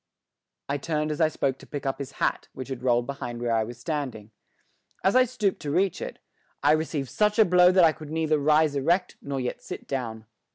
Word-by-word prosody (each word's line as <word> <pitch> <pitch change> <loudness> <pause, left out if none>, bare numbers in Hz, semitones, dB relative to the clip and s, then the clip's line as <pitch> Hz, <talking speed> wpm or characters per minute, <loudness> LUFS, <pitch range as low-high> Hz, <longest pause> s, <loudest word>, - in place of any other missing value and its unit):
I 140 +1 -1
turned 155 0 -1
as 150 - -2
I 160 - +6
spoke 135 -3 -1
to - - -14
pick 145 -2 -6
up 135 0 -1
his 140 - -6
hat, - - -1
which 130 0 -7
had 130 -2 -5
rolled 120 -1 +2
behind 120 -3 -5
where 120 -1 0
I 110 -1 +2
was 120 +2 -8
standing. 130 -9 -4 0.7
As 195 - +3
I 255 0 +6
stooped 220 -5 -1
to 150 - -4
reach 185 +5 +1
it, - - -5 0.5
I 145 - +5
received 155 -3 0
such 210 +1 +2
a 220 - +7
blow 180 0 +6
that 185 -1 +5
I 165 - +7
could 155 -1 -10
neither 155 -1 +1
rise 150 0 +3
erect 170 +7 +1
nor 140 -1 -3
yet 125 -1 -3
sit - - -8
down. 115 -5 -4
145 Hz, 220 wpm, -26 LUFS, 130-165 Hz, 0.7 s, a